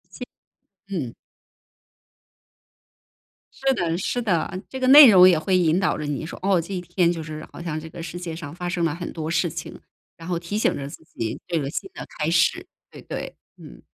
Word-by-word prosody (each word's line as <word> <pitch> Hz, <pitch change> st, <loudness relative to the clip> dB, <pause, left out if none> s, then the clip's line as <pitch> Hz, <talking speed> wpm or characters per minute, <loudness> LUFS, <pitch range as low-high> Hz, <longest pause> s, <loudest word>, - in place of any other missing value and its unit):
其 -, -, -6 dB, 0.6 s
嗯。 150 Hz, -12 st, -4 dB, 2.4 s
是 270 Hz, 0 st, +1 dB
的 170 Hz, -8 st, -1 dB
是 245 Hz, +6 st, -2 dB
的， 185 Hz, -2 st, -1 dB
这 265 Hz, -, -6 dB
个 255 Hz, -, 0 dB
内 280 Hz, -1 st, +11 dB
容 185 Hz, -2 st, +8 dB
也 175 Hz, -3 st, +5 dB
会 185 Hz, +3 st, +1 dB
引 170 Hz, -1 st, +3 dB
导 185 Hz, -, +1 dB
着 150 Hz, -, -5 dB
你 145 Hz, +1 st, -3 dB
说， -, -, -8 dB
哦， 190 Hz, -1 st, +2 dB
这 175 Hz, +4 st, -7 dB
一 180 Hz, -, -3 dB
天 175 Hz, 0 st, +1 dB
就 165 Hz, -2 st, -4 dB
是 155 Hz, 0 st, -8 dB
好 -, -, -10 dB
像 160 Hz, -2 st, -3 dB
这 160 Hz, +1 st, -9 dB
个 165 Hz, +1 st, -8 dB
世 175 Hz, -, -6 dB
界 170 Hz, -2 st, -5 dB
上 160 Hz, -2 st, -8 dB
发 180 Hz, 0 st, -5 dB
生 175 Hz, -1 st, -1 dB
了 160 Hz, -, 0 dB
很 175 Hz, +1 st, -6 dB
多 160 Hz, -1 st, -4 dB
事 165 Hz, +1 st, +1 dB
情， 160 Hz, 0 st, -8 dB, 0.4 s
然 165 Hz, +1 st, -11 dB
后 175 Hz, -2 st, -1 dB
提 175 Hz, +5 st, -4 dB
醒 215 Hz, -, +1 dB
着 140 Hz, 0 st, -5 dB
自 150 Hz, -, -12 dB
己 115 Hz, -9 st, -5 dB
这 170 Hz, -3 st, 0 dB
个 140 Hz, -, -3 dB
新 280 Hz, -, -5 dB
的 -, -, -8 dB
开 150 Hz, -, 0 dB
始， 175 Hz, -, +2 dB, 0.3 s
对 -, -, -12 dB
对。 -, -, -6 dB, 0.2 s
嗯。 -, -, -13 dB
170 Hz, 230 characters per minute, -23 LUFS, 160-185 Hz, 2.4 s, 内